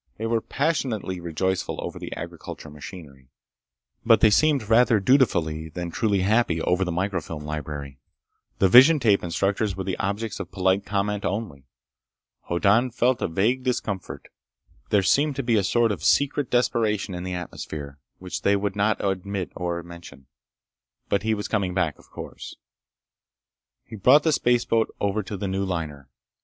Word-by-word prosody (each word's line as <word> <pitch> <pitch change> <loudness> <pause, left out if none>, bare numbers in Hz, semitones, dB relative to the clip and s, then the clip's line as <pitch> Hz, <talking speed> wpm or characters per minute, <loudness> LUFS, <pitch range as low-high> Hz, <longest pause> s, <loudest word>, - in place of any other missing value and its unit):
They 110 - -4
were 115 0 +1
passionately 125 - -2
rejoiceful 90 +3 -2
over - - -6
the - - -7
agricultural 75 - -8
machinery. 75 -4 -11 0.7
But 115 -1 +5
they 110 - +5
seemed 140 -2 +3
rather 115 0 +4
dutifully 85 - +2
than 85 +1 -5
truly 100 0 +1
happy 100 -4 +2
over 90 +3 +1
the 90 - -2
microfilm 85 -4 -3
library. 75 -2 -6 0.6
The 95 - +4
vision 130 - +8
tape 105 -6 +3
instructors 100 +4 -1
were 95 - -4
the 95 -1 -3
objects 105 +2 -3
of 95 -3 -6
polite 95 +1 +1
comment 105 0 -1
only. 85 - -4 0.8
Hoddan 105 +8 +3
felt 125 +1 +1
a - - +1
vague 110 +10 +1
discomfort. 110 -7 -3 0.6
There 100 -2 +3
seemed 145 +8 +2
to 135 - -2
be 120 -1 +2
a 105 - +2
sort 115 +4 +2
of 85 -7 -5
secret 140 -1 +2
desperation 110 -5 +1
in 90 - -5
the 90 -1 -4
atmosphere, 75 -5 -7 0.2
which 90 0 -6
they 100 - +3
would 100 0 -2
not 105 0 +1
admit 95 -1 -2
or 85 -1 -3
mention. 85 -5 -12 0.8
But 100 - +1
he 110 +1 0
was 105 - -4
coming 95 -4 -1
back. 85 -5 0
Of - - -20
course. - - -9 1.3
He 110 - -9
brought 130 +9 +5
the 160 - +2
spaceboat 120 -4 +1
over 100 +1 0
to 100 0 -6
the 100 - -3
new 95 +1 -1
liner. 80 -7 -4
100 Hz, 160 wpm, -24 LUFS, 90-115 Hz, 1.3 s, vision